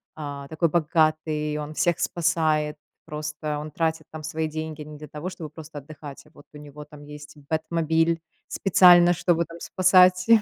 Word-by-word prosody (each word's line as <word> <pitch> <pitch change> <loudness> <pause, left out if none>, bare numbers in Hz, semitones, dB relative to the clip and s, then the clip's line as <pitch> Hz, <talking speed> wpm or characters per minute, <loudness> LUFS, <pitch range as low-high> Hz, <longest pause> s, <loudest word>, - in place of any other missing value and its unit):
а, 145 -2 -7
такой 160 +2 +1
богатый, 155 -1 0
он 150 0 -6
всех 175 +1 +1
спасает. 155 -3 0 0.3
Просто 150 0 -5
он 150 +1 -7
тратит 160 0 -2
там 155 -1 -8
свои 160 +1 -3
деньги 155 0 -6
не 150 0 -10
для 150 +1 -10
того, 150 +5 -6
чтобы 170 -4 -8
просто 155 -1 -11
отдыхать. 145 0 -11
А - - -20
вот 145 - -17
у - - -10
него 150 0 -11
там 150 0 -14
есть 150 +1 -12
бэтмобиль, 165 +1 0 0.3
специально, 175 -2 +6
чтобы 170 -1 +1
там 170 +1 -12
спасать 185 -1 +4
155 Hz, 165 wpm, -24 LUFS, 150-165 Hz, 0.3 s, специально